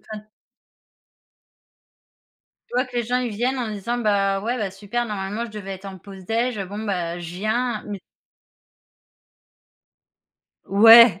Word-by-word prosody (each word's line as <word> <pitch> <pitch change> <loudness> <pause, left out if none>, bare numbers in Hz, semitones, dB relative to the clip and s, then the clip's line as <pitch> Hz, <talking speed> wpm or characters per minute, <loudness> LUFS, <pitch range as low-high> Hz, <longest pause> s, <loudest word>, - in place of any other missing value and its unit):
enfin 215 -1 -10 2.4
Tu - - -22
vois 250 +2 +2
que 250 -1 -8
les 240 - +1
gens, 245 +2 0
ils 245 -2 -2
viennent 255 +4 0
en 240 -3 -2
disant: 225 +4 -3
«Bah, 200 -3 +1
ouais, 235 +4 -2
bah 205 -5 -2
super, 210 +5 -3
normalement, 210 +2 -3
je 235 - -8
devais 205 -2 -7
être 190 +1 -9
en 190 -1 -8
pause 190 +1 -12
déj. 230 +3 -1
Bon, 200 +3 -7
bah, 175 -4 -2
je 175 0 -7
viens», 220 +3 -1
mais 200 -2 -5 2.7
Ouais. 225 -1 +8
210 Hz, 145 wpm, -23 LUFS, 195-235 Hz, 2.7 s, Ouais